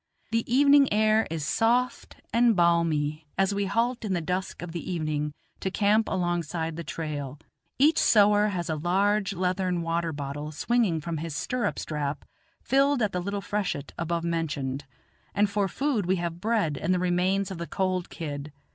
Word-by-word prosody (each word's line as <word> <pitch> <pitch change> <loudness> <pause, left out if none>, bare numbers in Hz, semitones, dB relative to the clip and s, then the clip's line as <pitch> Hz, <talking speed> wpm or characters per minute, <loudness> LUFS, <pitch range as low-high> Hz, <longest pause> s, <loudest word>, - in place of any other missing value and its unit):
The 230 +1 -1
evening 280 +1 +6
air 215 +1 +3
is 160 -2 -3
soft 235 +6 +1 0.2
and 235 -1 +4
balmy 165 -3 +1
I - - +3
as 195 +1 0
we 200 0 0
halt 235 +4 0
in 205 -3 -1
the 175 - +1
dusk 180 +2 -3
of 175 - -6
the 170 +2 -5
evening 155 -3 -1 0.3
to 190 - -2
camp 210 +3 +2
alongside 170 -2 -1
the 170 - -5
trail; 150 -4 -5 0.4
each 305 +5 +4
sowar 210 -1 +5
has 180 -4 -2
a 160 - -1
large 195 +5 +1
leathern 180 -1 0
water 165 0 -1
bottle 145 +1 -5
swinging 190 0 +1
from 165 +1 -3
his 160 -1 -5
stirrup 250 +10 -1
strap 150 -2 -3 0.4
filled 275 0 +3
at 210 - +1
the 180 - -2
little 200 +2 -3
freshet 195 -9 -3
above 170 0 -2
mentioned, 145 -5 -2 0.5
and 205 0 +2
for 200 -1 +1
food 240 -3 -1
we 190 - +3
have 170 -1 -4
bread 210 -10 0
and 185 +3 +1
the - - +1
remains 185 +2 +1
of 180 - -6
the 170 - -4
cold 185 +2 -1
kid. 145 -2 -6
180 Hz, 175 wpm, -27 LUFS, 160-210 Hz, 0.5 s, evening